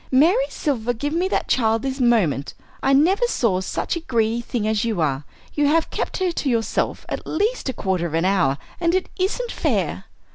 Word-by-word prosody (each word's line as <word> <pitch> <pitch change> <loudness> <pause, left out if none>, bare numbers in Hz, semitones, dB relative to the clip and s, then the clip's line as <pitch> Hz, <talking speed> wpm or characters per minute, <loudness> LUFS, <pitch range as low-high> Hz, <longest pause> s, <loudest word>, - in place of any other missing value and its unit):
Mary 350 - +4
Silver, 245 -6 -1
give 290 +6 -3
me 350 +3 +1
that - - -1
child 225 -2 +2
this 270 0 -3
moment! 205 - +2 0.3
I 270 - +2
never 365 - +4
saw 215 - +1
such 190 - -2
a - - -2
greedy 235 -6 0
thing 230 -2 -2
as 215 -1 +1
you 225 -5 -1
are; 145 -3 0 0.3
you 295 -1 +2
have 320 +2 +2
kept - - -3
her 370 -2 +1
to 295 -4 -2
yourself 230 -3 -1
at - - -5
least 420 - -1
a - - -2
quarter 185 -6 -1
of 160 - -4
an 165 +2 +1
hour, 170 -9 +2 0.2
and 340 0 +2
it 375 - -1
isn't 470 +6 -1
fair." - - -1
245 Hz, 205 wpm, -22 LUFS, 215-335 Hz, 0.3 s, Mary